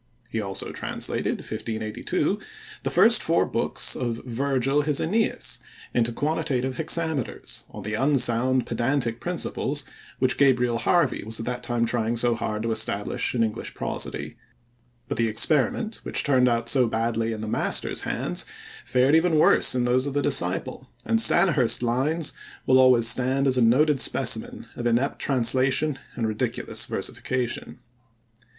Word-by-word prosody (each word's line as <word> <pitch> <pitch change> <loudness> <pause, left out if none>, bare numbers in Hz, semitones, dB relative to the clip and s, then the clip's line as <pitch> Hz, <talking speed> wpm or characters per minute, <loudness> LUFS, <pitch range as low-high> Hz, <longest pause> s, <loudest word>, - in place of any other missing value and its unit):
He 110 - -2
also 95 -1 -4
translated - - -1
(1582) 110 -1 -3 0.4
the - - -2
first - - +5
four - - +2
books - - 0
of 120 -2 -3
Virgil 135 +3 0
his 145 -1 0
Aeneis 215 +7 -1 0.3
into 120 -1 +1
quantitative 140 -2 -2
hexameters, 160 -4 -2
on 105 - -9
the 105 +1 -4
unsound 130 -1 +3
pedantic 120 0 -1
principles 150 -5 -2 0.3
which 130 -1 0
Gabriel 125 -4 +3
Harvey 175 +5 +1
was 110 +2 -2
at 115 - -5
that 125 0 -4
time 120 -1 -1
trying 115 0 -1
so 120 +1 +3
hard 110 -2 -3
to 115 - -1
establish 110 +1 -1
in 115 - +2
English 110 -1 -4
prosody; - - -4 0.7
but - - -4
the 115 0 +1
experiment, 150 - 0
which - - -1
turned 130 -3 +3
out 115 -1 0
so 125 0 +4
badly 115 0 -1
in 110 -1 -5
the 110 - -5
master's - - 0
hands, - - -1 0.4
fared 130 +3 +2
even 165 0 +3
worse 150 - +5
in 125 -1 +1
those 130 +3 +1
of 140 - -5
the 145 - +1
disciple, - - 0 0.2
and 225 - +1
Stanyhurst's 155 - +3
lines 140 +7 0 0.3
will 130 0 +4
always 125 -3 +5
stand 130 +3 +2
as 130 -2 +3
a 125 - +2
noted 135 +5 +3
specimen - - 0
of 120 - -3
inept 120 +4 0
translation 135 +3 +1 0.2
and 115 -2 -1
ridiculous 110 -1 -2
versification. 125 -2 -4
125 Hz, 150 wpm, -24 LUFS, 115-140 Hz, 0.7 s, first